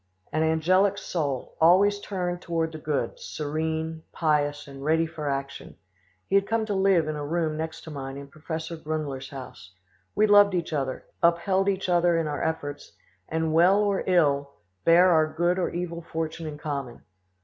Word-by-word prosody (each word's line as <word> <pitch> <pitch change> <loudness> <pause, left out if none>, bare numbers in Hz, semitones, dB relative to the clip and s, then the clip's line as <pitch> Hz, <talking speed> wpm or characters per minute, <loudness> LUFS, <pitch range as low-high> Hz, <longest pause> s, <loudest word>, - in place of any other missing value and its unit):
An 155 - +1
angelic 185 +5 +3
soul, 145 -10 -3
always 195 +5 +5
turned 180 -3 -3
toward 165 -2 -1
the 155 - -8
good, 150 -6 -2
serene, 160 +1 -3
pious, 145 -2 0
and 135 -1 -10
ready 160 +2 +2
for 155 -2 -5
action; 140 0 -5 0.5
he - - -6
had 195 0 +4
come 225 -1 0
to 210 - -2
live 190 -4 +3
in 155 - -2
a 145 - -4
room 160 +1 -1
next 160 +1 -5
to 160 - -10
mine 135 -1 -6
in 140 0 -8
Professor 160 +3 -6
Grunler's 150 -4 -4
house; 125 -9 -10 0.4
we 215 - +4
loved 205 -2 +6
each 170 -2 -2
other, 135 -3 -2 0.2
upheld 185 +3 +2
each 195 -1 -1
other 175 -1 +3
in 165 - 0
our 150 -1 -3
efforts, 145 -3 -4 0.4
and, 160 0 -1
well 175 +4 +5
or 200 -2 0
ill, 145 -6 +2 0.3
bare 175 +2 +6
our 160 -2 +4
good 175 +3 +1
or 180 - 0
evil 170 -1 -4
fortune 160 0 -4
in 150 -1 -6
common. 140 -5 -5
160 Hz, 175 wpm, -26 LUFS, 150-175 Hz, 0.5 s, loved